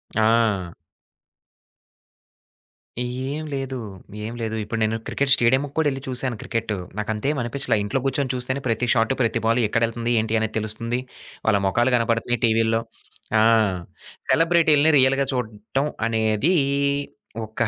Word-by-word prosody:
ఆ! 110 -5 +2 2.3
ఏం 130 +5 -4
లేదు. 135 -1 -3 0.5
ఏం 115 - -5
లేదు. 110 -1 -2
ఇప్పుడు 110 +2 -4
నేను 110 +1 0
క్రికెట్ 140 -1 0
స్టేడియంకు 130 +4 +3
కూడా 160 -2 +3
ఏళ్లి 135 0 -5
చూసాను 130 -1 +1
క్రికెట్, 115 -2 -3 0.3
నాకంతేమి 110 +7 -1
అనిపిచ్చలా 120 0 -1
ఇంట్లో 105 +6 -1
కూర్చొని 135 -1 0
చూస్తేనే 130 +2 -2
ప్రతి 115 +1 0
షాట్ 115 +1 +2
ప్రతి 115 -1 +1
బాల్ 115 +2 +3
ఎక్కడెళ్తుంది 115 +2 0
ఏంటి 110 +1 0
అనేది 110 0 -2
తెలుస్తుంది, 115 +3 -2 0.5
వాళ్ళ 105 -2 +4
మొఖాలు 120 +6 +2
కనబడుతున్నాయి 115 0 0
టీవీ‌లో. 115 0 +2 0.6
ఆ! - - +5 0.9
సెలబ్రిటీలని 160 -2 +4
రియల్‌గా 135 +1 +3
చూడటం 120 +3 -2 0.2
అనేది 110 - +1 0.9
ఒకా 110 +2 -2
115 Hz, 120 wpm, -23 LUFS, 110-135 Hz, 2.3 s, ఆ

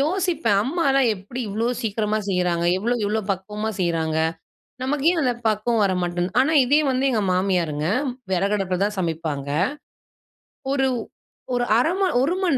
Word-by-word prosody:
யோசிப்பேன் 320 - +1
அம்மால்லாம் 275 -2 +2
எப்படி 205 +7 -7
இவ்வளவு 225 +4 -1
சீக்கிரமா 215 -1 -1
செய்றாங்க? 180 -2 0
எவ்ளோ 235 +5 0
இவ்ளோ 215 +2 0
பக்குவமா 210 +3 -3
செய்றாங்க? 165 -3 0 0.6
நமக்கு 280 +2 -1
ஏன் 340 - 0
அந்த 250 -3 +2
பக்குவம் 215 +1 +1
வர 195 - +2
மாட்டேங்குது. 175 +1 -2
ஆனா 280 +5 +3
இதே 285 +5 +4
வந்து 260 0 0
எங்க 220 -3 +1
மாமியாருங்க, 175 -5 0 0.5
விறகு 195 +3 +1
அடுப்பில 185 -2 -2
தான் 210 0 -3
சமைப்பாங்க. 160 -5 -3 1.2
ஒரு 270 -1 +2 0.7
ஒரு 245 0 +1
1/2 310 +8 +3
மணி 380 -2 +2
1 285 +6 +2
மணி 340 -8 +2
215 Hz, 150 wpm, -23 LUFS, 180-265 Hz, 1.2 s, இதே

